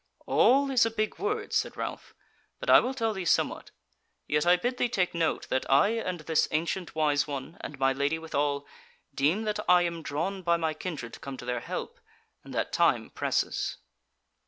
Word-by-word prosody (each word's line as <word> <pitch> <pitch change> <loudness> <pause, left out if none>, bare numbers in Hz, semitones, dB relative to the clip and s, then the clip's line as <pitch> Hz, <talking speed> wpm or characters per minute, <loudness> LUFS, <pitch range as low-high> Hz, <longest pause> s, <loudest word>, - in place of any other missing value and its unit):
"'All' 275 +2 +4
is 255 -3 +5
a 225 - +2
big 215 -1 -2
word," 420 +2 -2
said - - 0
Ralph, - - -6 0.4
"but - - 0
I - - +10
will 260 +2 -2
tell 225 -3 0
thee 190 -2 -4
somewhat. 170 - +1 0.6
Yet 150 +3 +1
I 175 - +7
bid 245 +8 -2
thee 245 - +1
take 185 -6 0
note 165 -2 -1
that 130 - +1
I 140 +9 +5
and 185 -7 -2
this 160 0 +1
ancient 170 +3 -2
wise 150 -3 +2
one, 140 +3 -6
and 145 - -7
my 135 0 +2
Lady 140 +4 0
withal, 145 -3 -1 0.5
deem 155 +11 +1
that 210 -1 -2
I 180 0 +6
am 170 -1 -3
drawn 165 +7 -3
by 170 -1 +2
my 160 -1 -1
kindred 155 -7 -6
to - - -9
come 135 -1 -7
to 125 - -9
their 125 -1 -1
help, - - -6 0.4
and - - -12
that - - -2
time - - +2
presses." - - -1
170 Hz, 195 wpm, -28 LUFS, 145-215 Hz, 0.6 s, I